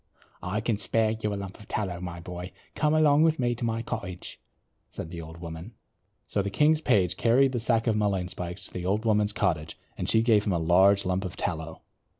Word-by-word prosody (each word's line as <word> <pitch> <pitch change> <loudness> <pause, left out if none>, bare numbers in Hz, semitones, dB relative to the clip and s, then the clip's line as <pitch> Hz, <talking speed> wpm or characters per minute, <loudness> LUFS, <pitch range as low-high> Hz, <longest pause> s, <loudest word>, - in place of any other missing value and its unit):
"I 90 +5 -2
can 110 -2 -1
spare 110 -1 +1
you 110 -1 -2
a - - -2
lump 100 -1 -7
of 105 - -14
tallow, 95 -5 -3
my 85 -1 -6
boy. 90 +2 -7 0.2
Come 150 0 +1
along 150 -1 +5
with 160 0 +4
me 120 -2 +1
to 120 - -6
my 115 0 -1
cottage," 100 -7 -6 0.5
said 80 - -7
the 85 -1 -6
old 80 +1 -10
woman. 85 +6 -8 0.5
So 100 - 0
the 100 - -2
king's 150 +8 +3
page 95 - +2
carried 130 +3 +4
the 125 - -1
sack 115 0 +1
of 115 -3 +2
mullein 100 -4 0
spikes 90 +1 -5
to - - -11
the 90 0 -4
old 105 +4 0
woman's 105 -1 +3
cottage 80 -7 -1 0.2
and - - -3
she 110 - +4
gave 110 -3 +4
him 100 - +2
a - - +1
large 95 +5 +4
lump 90 +1 0
of 90 0 -5
tallow. 80 -3 -4
100 Hz, 220 wpm, -27 LUFS, 90-115 Hz, 0.5 s, along